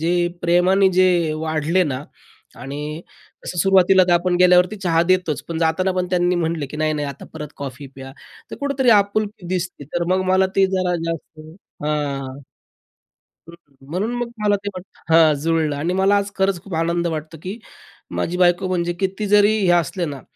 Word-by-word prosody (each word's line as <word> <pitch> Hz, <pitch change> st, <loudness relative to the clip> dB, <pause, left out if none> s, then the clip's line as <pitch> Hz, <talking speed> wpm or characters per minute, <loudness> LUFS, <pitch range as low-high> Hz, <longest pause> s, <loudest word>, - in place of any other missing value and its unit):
जे 175 Hz, +2 st, +1 dB, 0.2 s
प्रेमाने 180 Hz, +3 st, +3 dB
जे 175 Hz, -3 st, +3 dB
वाढले 160 Hz, +3 st, 0 dB
ना 140 Hz, -1 st, -4 dB, 0.6 s
आणि 150 Hz, +4 st, -6 dB, 0.4 s
तसं 175 Hz, -, -5 dB
सुरुवातीला 190 Hz, 0 st, +5 dB
तर -, -, +4 dB
आपण 175 Hz, +1 st, +2 dB
गेल्यावरती 180 Hz, +2 st, +5 dB
चहा 170 Hz, -4 st, +1 dB
देतोच, 185 Hz, -3 st, 0 dB
पण 165 Hz, -1 st, -3 dB
जाताना 185 Hz, +3 st, +1 dB
पण 180 Hz, -1 st, -1 dB
त्यांनी 180 Hz, 0 st, +2 dB
म्हटले, 165 Hz, -3 st, -2 dB
की 150 Hz, -, -9 dB
नाही, 155 Hz, 0 st, +1 dB
नाही 145 Hz, -1 st, -3 dB
आता 140 Hz, -, -9 dB
परत 150 Hz, -2 st, -6 dB
कॉफी 140 Hz, 0 st, -7 dB
प्या. 135 Hz, 0 st, -10 dB, 0.4 s
तर -, -, -7 dB
कुठेतरी 275 Hz, -3 st, +1 dB
आपुलकी 205 Hz, -2 st, +1 dB
दिसते. 180 Hz, -5 st, -4 dB
तर 170 Hz, +4 st, -3 dB
मग 185 Hz, -, +1 dB
मला 190 Hz, 0 st, +4 dB
ते 195 Hz, 0 st, +5 dB
जरा 180 Hz, -1 st, 0 dB, 0.2 s
जास्त 160 Hz, -1 st, -8 dB, 0.4 s
हां. 140 Hz, -2 st, -3 dB, 1.1 s
हं, 170 Hz, -, -11 dB, 0.4 s
म्हणून 205 Hz, +7 st, -2 dB
मग 240 Hz, -1 st, -3 dB
मला 205 Hz, -1 st, +3 dB
ते 200 Hz, +1 st, -5 dB
वाटतं 180 Hz, -2 st, -6 dB
हां, 160 Hz, -2 st, +6 dB
जुळलं 160 Hz, -2 st, 0 dB
आणि 165 Hz, +5 st, -2 dB
मला 195 Hz, +2 st, +3 dB
आज 200 Hz, 0 st, -1 dB
खरंच 190 Hz, -2 st, 0 dB
खूप 195 Hz, -, -10 dB
आनंद 170 Hz, +1 st, 0 dB
वाटतो, 160 Hz, 0 st, -5 dB
की 195 Hz, +5 st, -5 dB, 0.6 s
माझी 180 Hz, +1 st, -2 dB
बायको 180 Hz, +1 st, +3 dB
म्हणजे 175 Hz, -1 st, -1 dB
किती 195 Hz, +2 st, -2 dB
जरी 210 Hz, +1 st, +4 dB
हे 190 Hz, -3 st, +1 dB
असले 170 Hz, +3 st, -3 dB
ना, 140 Hz, -3 st, -6 dB
175 Hz, 175 wpm, -20 LUFS, 155-190 Hz, 1.1 s, हां